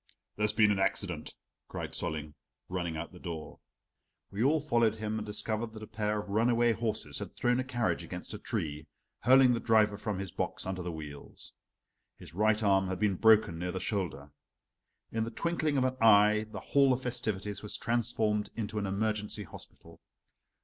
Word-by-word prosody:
"There's 105 Hz, 0 st, +2 dB
been 105 Hz, 0 st, +4 dB
an 100 Hz, -, 0 dB
accident," 90 Hz, -4 st, -2 dB, 0.3 s
cried -, -, -5 dB
Solling, 75 Hz, -3 st, -4 dB, 0.4 s
running 85 Hz, -3 st, -2 dB
out 85 Hz, -, -5 dB
to -, -, -22 dB
the 90 Hz, -, -12 dB
door. 80 Hz, -4 st, -6 dB, 0.7 s
We 100 Hz, +3 st, -1 dB
all 150 Hz, +4 st, +4 dB
followed 120 Hz, -7 st, +2 dB
him 110 Hz, 0 st, -3 dB
and 105 Hz, -, -5 dB
discovered 110 Hz, +2 st, -2 dB
that 110 Hz, -1 st, -8 dB
a -, -, -5 dB
pair 105 Hz, -1 st, -2 dB
of 105 Hz, -, -6 dB
runaway 115 Hz, +3 st, +3 dB
horses 110 Hz, -1 st, -3 dB
had -, -, -7 dB
thrown 120 Hz, +1 st, +2 dB
a -, -, 0 dB
carriage 120 Hz, -3 st, -1 dB
against -, -, -5 dB
a -, -, -6 dB
tree, 75 Hz, 0 st, -3 dB, 0.3 s
hurling 130 Hz, +2 st, +6 dB
the 115 Hz, -, 0 dB
driver 105 Hz, -3 st, +3 dB
from 105 Hz, -2 st, -2 dB
his 95 Hz, -1 st, -5 dB
box, -, -, -2 dB
under 95 Hz, -1 st, -3 dB
the 90 Hz, 0 st, -4 dB
wheels. 75 Hz, -3 st, -9 dB, 0.6 s
His -, -, -12 dB
right 110 Hz, +3 st, +2 dB
arm 95 Hz, -2 st, +3 dB
had 95 Hz, 0 st, -2 dB
been 105 Hz, -2 st, +2 dB
broken 110 Hz, -4 st, +4 dB
near 90 Hz, +1 st, -2 dB
the 95 Hz, -, -3 dB
shoulder. 85 Hz, -8 st, -3 dB, 0.8 s
In 110 Hz, 0 st, 0 dB
the 115 Hz, -, -3 dB
twinkling 155 Hz, +3 st, -1 dB
of 130 Hz, -, +3 dB
an 130 Hz, 0 st, 0 dB
eye 105 Hz, -1 st, +6 dB
the -, -, -6 dB
hall 140 Hz, -2 st, +4 dB
of 130 Hz, +1 st, -3 dB
festivities 105 Hz, -5 st, -2 dB
was 105 Hz, -, -5 dB
transformed 110 Hz, -3 st, 0 dB
into 110 Hz, -1 st, -3 dB
an 100 Hz, -, -2 dB
emergency 105 Hz, +1 st, -1 dB
hospital. 85 Hz, -, -13 dB
105 Hz, 185 wpm, -31 LUFS, 95-115 Hz, 0.8 s, hurling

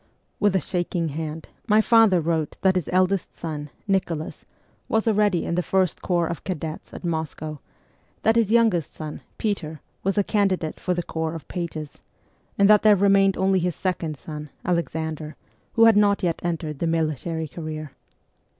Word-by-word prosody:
With 205 Hz, -2 st, +3 dB
a -, -, +4 dB
shaking 175 Hz, -2 st, -2 dB
hand 155 Hz, +1 st, -5 dB, 0.2 s
my 210 Hz, -1 st, +5 dB
father 220 Hz, -4 st, +5 dB
wrote 160 Hz, -2 st, -1 dB
that 190 Hz, -1 st, +4 dB
his 180 Hz, -4 st, -2 dB
eldest 185 Hz, +1 st, +1 dB
son, 150 Hz, -3 st, -5 dB, 0.2 s
Nicholas, 175 Hz, -5 st, -1 dB, 0.4 s
was 220 Hz, 0 st, +1 dB
already 210 Hz, -5 st, +2 dB
in -, -, -2 dB
the 180 Hz, -, +1 dB
first 185 Hz, -1 st, 0 dB
corps 175 Hz, -2 st, +1 dB
of 170 Hz, -1 st, -5 dB
cadets 160 Hz, -4 st, -5 dB
at -, -, -9 dB
Moscow; 155 Hz, -2 st, -3 dB, 0.6 s
that 225 Hz, -, +4 dB
his 225 Hz, -3 st, +2 dB
youngest 225 Hz, -9 st, +3 dB
son, 155 Hz, -1 st, -7 dB, 0.2 s
Peter, 160 Hz, -8 st, -2 dB, 0.2 s
was 195 Hz, +2 st, 0 dB
a 205 Hz, -, +4 dB
candidate 190 Hz, -6 st, 0 dB
for 180 Hz, -, -1 dB
the 175 Hz, -, -2 dB
corps 160 Hz, 0 st, -3 dB
of 160 Hz, -, -8 dB
pages; 160 Hz, -5 st, -5 dB, 0.6 s
and 200 Hz, -, +5 dB
that 210 Hz, 0 st, +7 dB
there 215 Hz, -1 st, +6 dB
remained 195 Hz, 0 st, +4 dB
only 190 Hz, 0 st, +3 dB
his 175 Hz, -1 st, -1 dB
second 170 Hz, -5 st, -2 dB
son, 150 Hz, +1 st, -8 dB, 0.2 s
Alexander, 160 Hz, -3 st, -2 dB, 0.4 s
who 230 Hz, -1 st, +6 dB
had 225 Hz, -2 st, +7 dB
not 205 Hz, -1 st, +3 dB
yet 170 Hz, -2 st, 0 dB
entered 160 Hz, -4 st, -3 dB
the 170 Hz, -, 0 dB
military 160 Hz, 0 st, -1 dB
career. 155 Hz, -1 st, -6 dB
175 Hz, 170 wpm, -24 LUFS, 160-195 Hz, 0.6 s, that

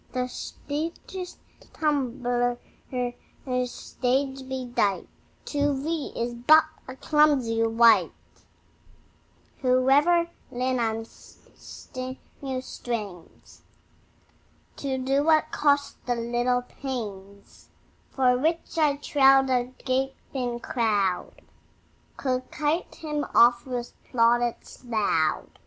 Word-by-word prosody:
The 255 Hz, -, 0 dB
featest 320 Hz, +8 st, -5 dB, 0.4 s
tumbler, 245 Hz, -5 st, 0 dB, 1.1 s
stage 265 Hz, +2 st, -2 dB
bedight, 245 Hz, -6 st, -1 dB, 0.4 s
To 285 Hz, -2 st, 0 dB
thee 315 Hz, +1 st, -3 dB
is 240 Hz, +1 st, -2 dB
but 280 Hz, +7 st, +6 dB, 0.2 s
a 260 Hz, -, -7 dB
clumsy 275 Hz, -7 st, +2 dB
wight, 230 Hz, +1 st, +5 dB, 1.5 s
Who 255 Hz, 0 st, +2 dB
every 340 Hz, +4 st, +4 dB, 0.2 s
limb 255 Hz, 0 st, -1 dB
and 225 Hz, -1 st, -1 dB
sinew 260 Hz, +2 st, -9 dB
strains 210 Hz, -9 st, -7 dB, 1.2 s
To 270 Hz, -2 st, -2 dB
do 270 Hz, +2 st, +1 dB
what 315 Hz, 0 st, +3 dB
costs 285 Hz, -1 st, +1 dB
thee 245 Hz, -, +1 dB
little 240 Hz, +1 st, 0 dB
pains; 205 Hz, -7 st, -8 dB, 0.4 s
For 255 Hz, -2 st, +3 dB
which, 330 Hz, +3 st, -1 dB
I 295 Hz, -3 st, +3 dB
trow, 270 Hz, -2 st, +4 dB
the 250 Hz, -1 st, 0 dB
gaping 255 Hz, -2 st, -2 dB
crowd 205 Hz, -8 st, -1 dB, 0.8 s
Requite 295 Hz, +5 st, -1 dB
him 300 Hz, -2 st, -3 dB
oft 240 Hz, +1 st, +5 dB
with 245 Hz, -2 st, -4 dB
plaudits 240 Hz, +1 st, +1 dB
loud. 205 Hz, -10 st, 0 dB
255 Hz, 90 wpm, -26 LUFS, 240-285 Hz, 1.5 s, but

